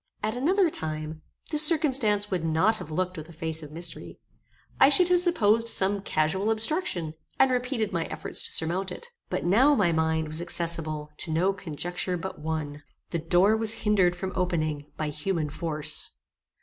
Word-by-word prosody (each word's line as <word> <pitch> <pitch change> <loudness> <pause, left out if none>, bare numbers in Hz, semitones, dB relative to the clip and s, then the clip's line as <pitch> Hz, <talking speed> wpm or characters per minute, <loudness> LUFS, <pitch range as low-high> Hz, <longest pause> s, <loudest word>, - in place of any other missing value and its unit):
At 215 +2 -1
another 345 +7 +2
time, 155 - -4 0.3
this 300 -1 +6
circumstance 255 -11 +2
would 180 -3 -1
not 165 +8 +2
have 155 - -9
looked 185 +3 -2
with 155 +1 -8
a - - -12
face 160 0 -4
of 150 -1 -10
mystery. 170 +2 -4 0.6
I 270 - +7
should 355 +5 +4
have 360 0 +5
supposed 230 - +2
some 200 -2 +3
casual 190 +4 0
obstruction, 225 - 0 0.2
and 265 -1 +4
repeated 250 -4 -1
my 165 -2 -1
efforts - - -4
to - - -2
surmount 180 +4 0
it. 475 - -6 0.2
But - - -3
now 255 +11 +5
my 190 -8 +2
mind 160 -1 0
was 155 +2 -1
accessible 165 -3 -2
to 165 - -3
no 180 +5 +2
conjecture 180 +1 -4
but 190 +3 -7
one. 150 -2 -4 0.3
The 170 - -1
door 180 +6 +3
was 220 0 +3
hindered 190 -4 +3
from 190 +1 -5
opening 155 -5 -1
by 155 -1 -2
human 150 0 -3
force. 155 -2 -1
180 Hz, 175 wpm, -26 LUFS, 160-220 Hz, 0.6 s, I